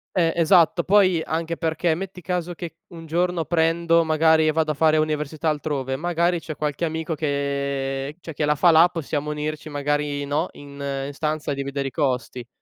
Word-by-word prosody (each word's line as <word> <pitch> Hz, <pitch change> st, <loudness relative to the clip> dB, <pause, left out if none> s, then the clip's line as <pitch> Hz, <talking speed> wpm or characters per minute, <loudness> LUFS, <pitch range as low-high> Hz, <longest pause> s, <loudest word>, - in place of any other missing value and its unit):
Eh 165 Hz, -3 st, +2 dB
esatto. 170 Hz, 0 st, +4 dB
Poi 185 Hz, -4 st, +4 dB
anche 165 Hz, +1 st, -3 dB
perché 165 Hz, 0 st, 0 dB
metti 185 Hz, +2 st, -6 dB
caso 175 Hz, 0 st, -2 dB
che 170 Hz, -1 st, -8 dB
un 165 Hz, -2 st, -11 dB
giorno 170 Hz, +1 st, 0 dB
prendo 165 Hz, 0 st, +2 dB
magari 160 Hz, 0 st, +3 dB
e -, -, +4 dB
vado 155 Hz, 0 st, +1 dB
a -, -, -1 dB
fare 155 Hz, +1 st, +3 dB
università 155 Hz, 0 st, -1 dB
altrove, 140 Hz, -3 st, -2 dB
magari 170 Hz, +3 st, 0 dB
c’è 155 Hz, -1 st, -7 dB
qualche 150 Hz, +3 st, -2 dB
amico 160 Hz, +1 st, -3 dB
che 140 Hz, -1 st, -2 dB
cioè 165 Hz, -2 st, -8 dB
che 150 Hz, -, -1 dB
la 150 Hz, 0 st, +2 dB
fa 175 Hz, +3 st, +5 dB
la, 165 Hz, +2 st, +6 dB
possiamo 150 Hz, -3 st, -3 dB
unirci 155 Hz, +1 st, -4 dB
magari, 145 Hz, 0 st, -1 dB
no, 150 Hz, +5 st, 0 dB
in 145 Hz, -, -12 dB, 0.4 s
in 145 Hz, -, -7 dB
stanza, 150 Hz, 0 st, -2 dB
dividere 140 Hz, 0 st, -3 dB
i -, -, -23 dB
costi. 125 Hz, -3 st, -2 dB
155 Hz, 180 wpm, -23 LUFS, 145-170 Hz, 0.4 s, la